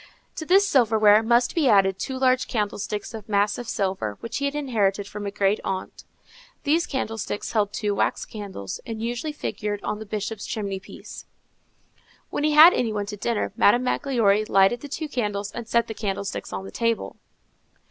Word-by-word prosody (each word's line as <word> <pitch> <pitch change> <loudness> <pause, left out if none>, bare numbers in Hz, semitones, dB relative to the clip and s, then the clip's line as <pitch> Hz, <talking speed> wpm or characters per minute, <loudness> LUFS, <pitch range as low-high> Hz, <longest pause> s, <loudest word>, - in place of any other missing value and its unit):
To 315 - -5
this 390 +3 +5
silverware 220 - +5
must 235 +2 +2
be 305 -6 +2
added 195 -2 +4
two 265 - -3
large 255 -1 +2
candlesticks 210 -1 -3
of 220 -1 -9
massive 210 +3 0
silver, 185 - -2
which 230 - -5
he 280 - -1
had 280 +1 -2
inherited 210 -8 0
from 205 0 -6
a - - -1
great 200 +1 +1
aunt. 190 -1 -5 0.6
These 325 +4 +2
candlesticks 225 -6 -3
held 210 -2 +1
two 205 0 -1
wax - - 0
candles, 195 - -7
and 225 -2 -6
usually 240 +6 -3
figured 210 -8 -4
on 210 - -3
the 220 - -8
Bishop's 210 0 -4
chimney 200 -3 -3
piece. - - -11 1.0
When - - -2
he 305 0 +2
had 315 +4 +9
any 235 -3 0
one 205 -1 -2
to 205 - -6
dinner, 210 -1 -2
Madame 240 +5 +4
Magloire 230 -6 +2
lighted 195 +5 +4
the 290 - -8
two 310 +2 -4
candles 210 -7 -2
and 235 -1 -7
set 235 0 +2
the 220 - -6
candlesticks 200 -2 -4
on 190 - -5
the - - -9
table. 230 -1 -1
215 Hz, 180 wpm, -24 LUFS, 200-245 Hz, 1.0 s, had